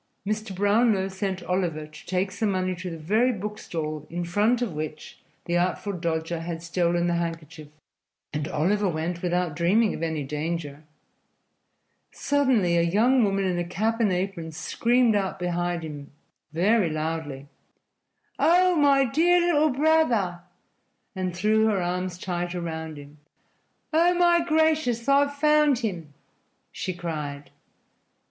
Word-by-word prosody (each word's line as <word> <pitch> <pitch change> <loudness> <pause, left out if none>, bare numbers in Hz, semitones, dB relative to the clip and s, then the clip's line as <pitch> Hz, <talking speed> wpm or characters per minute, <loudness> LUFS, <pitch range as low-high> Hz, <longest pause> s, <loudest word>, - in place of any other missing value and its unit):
Mr. 215 -1 -3
Brownlow 205 0 +2
sent 190 -1 -3
Oliver 175 -4 -1
to 155 0 -14
take 190 +1 -1
some 210 +3 -1
money 185 -1 0
to 180 +1 -6
the 165 - -6
very 215 +11 +2
book 210 -1 -5
stall 155 -2 -5
in 175 +1 -3
front 210 +7 +2
of 225 - -3
which 155 0 -7 0.3
the 175 - -1
Artful 180 +3 0
Dodger 165 -1 -2
had 165 0 -5
stolen 170 0 0
the 175 - +1
handkerchief, 165 -2 -4 0.7
and 150 0 -2
Oliver 195 +7 +1
went 170 +1 -3
without 175 -3 -1
dreaming 200 +7 +2
of - - -6
any 160 -3 -2
danger. 150 0 -4 1.3
Suddenly 255 -12 +1
a - - +4
young 225 +9 +3
woman 195 -1 +1
in 180 -2 0
a - - 0
cap 220 +6 -1
and 215 -4 +2
apron 180 -3 -3
screamed 230 +8 +1
out 195 -2 -1
behind 175 -1 -2
him 145 -3 -8 0.4
very 190 +3 +2
loudly: 155 -3 -4 0.9
"Oh, 360 +2 +4
my 280 -3 +4
dear 335 +8 +3
little 305 +1 +4
brother!" 255 - +2 0.8
and 185 -2 -3
threw 215 +4 +2
her 210 -3 +1
arms 180 0 -2
tight 175 -1 -3
around 160 -2 -5
him. 145 +1 -13 0.7
"Oh, 345 +3 +4
my 345 -1 +4
gracious, 310 -7 +1
I've 285 +1 +3
found 300 -1 +3
him!" 180 - -4 0.6
she 185 - -4
cried. 150 -5 -5
180 Hz, 140 wpm, -25 LUFS, 165-225 Hz, 1.3 s, a